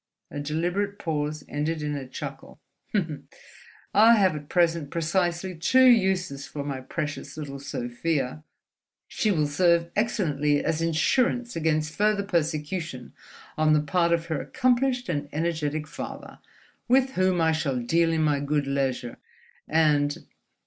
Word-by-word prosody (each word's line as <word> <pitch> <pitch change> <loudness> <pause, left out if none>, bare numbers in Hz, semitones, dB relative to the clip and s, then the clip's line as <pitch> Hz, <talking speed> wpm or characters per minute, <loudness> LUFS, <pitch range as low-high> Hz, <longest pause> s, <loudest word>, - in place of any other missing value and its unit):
A 145 - -5
deliberate 175 +7 -1
pause 150 -4 -3
ended 150 +2 -2
in 150 0 -2
a 135 -2 -5
chuckle. 135 +1 -8 1.3
"I 220 +3 +7
have 190 -6 +3
at 145 -1 -8
present 170 -4 +1
precisely 175 +2 -1
two 255 +11 +4
uses 190 - +3
for 145 - -5
my 140 -2 -4
precious 145 +1 -5
little 140 -3 -6
Sofia: 135 +3 -3 0.6
She 215 - -1
will 160 -7 +2
serve 170 +3 +2
excellently 150 -10 +1
as 160 0 0
insurance 235 - +1
against 155 -1 0
further 210 +1 +2
persecution 160 - -2 0.5
on 155 0 +4
the 150 - +5
part 170 +3 +1
of 170 -1 +1
her 160 -3 -2
accomplished 250 0 +1
and 145 -3 -2
energetic 155 -1 -2
father—with 260 +10 -3
whom 185 -4 +1
I 160 -1 +3
shall 155 -5 -1
deal 165 +7 +2
in 160 -1 +1
my 150 -2 +2
good 145 0 0
leisure—and 145 - -1
160 Hz, 130 wpm, -26 LUFS, 145-185 Hz, 1.3 s, I